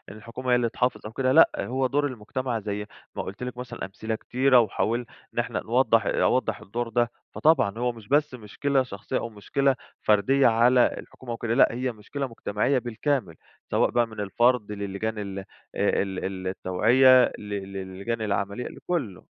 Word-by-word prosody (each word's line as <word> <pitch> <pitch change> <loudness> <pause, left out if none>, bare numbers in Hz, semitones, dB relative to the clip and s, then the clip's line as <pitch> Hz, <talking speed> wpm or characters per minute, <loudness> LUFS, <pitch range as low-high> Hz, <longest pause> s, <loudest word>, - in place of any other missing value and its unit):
الحكومة 120 +4 -5
هي - - +6
اللي 120 -1 +1
تحافظ 125 +2 -1
أو 110 - -6
كده 130 +2 0
لأ، 160 +4 +7
هو 130 +1 0
دور 145 +2 +1
المجتمع 125 0 -3
زي 105 0 -4 0.3
ما - - -3
قُلت 100 +6 -7
لِك 125 -1 -5
مثلًا 125 -1 -6
أمثلة 110 +3 -4
كتيرة 130 +2 +3
وحاول 115 +2 0 0.3
إن - - -2
إحنا - - -1
نوضح - - +3
أوضّح - - +1
الدور 115 +4 -4
ده، 120 0 +1 0.2
فطبعًا 115 -10 +3
هو 125 0 0
مش 115 -3 -14
بس 145 0 +2
مشكلة 130 +4 -1
شخصيّة، 100 -6 -4
أو 115 - -3
مشكلة 135 +6 0 0.3
فردية 110 +7 +4
على 120 +2 +5
الحكومة 125 -2 -10
أو 115 - -3
كده، 115 -1 -2
لأ 135 - +6
هي 125 +1 -2
مشكلة 130 +6 -5
مجتمعية 115 +3 0
بالكامل، 120 - -2 0.4
سواء - - +3
بقى 120 -1 +2
من 110 -1 -10
الفرد 105 +2 +2
لللجان 100 +2 -3
ال 100 -1 -5
آآ، 95 - -9 0.3
ال 95 -1 -1
التوعية 125 +8 +5 0.2
ل - - -10
ل 100 -1 -5
لللجان 95 +4 -4
العمليّة 100 +2 -2
لكُلّه. 135 - -4
115 Hz, 175 wpm, -26 LUFS, 105-130 Hz, 0.4 s, لأ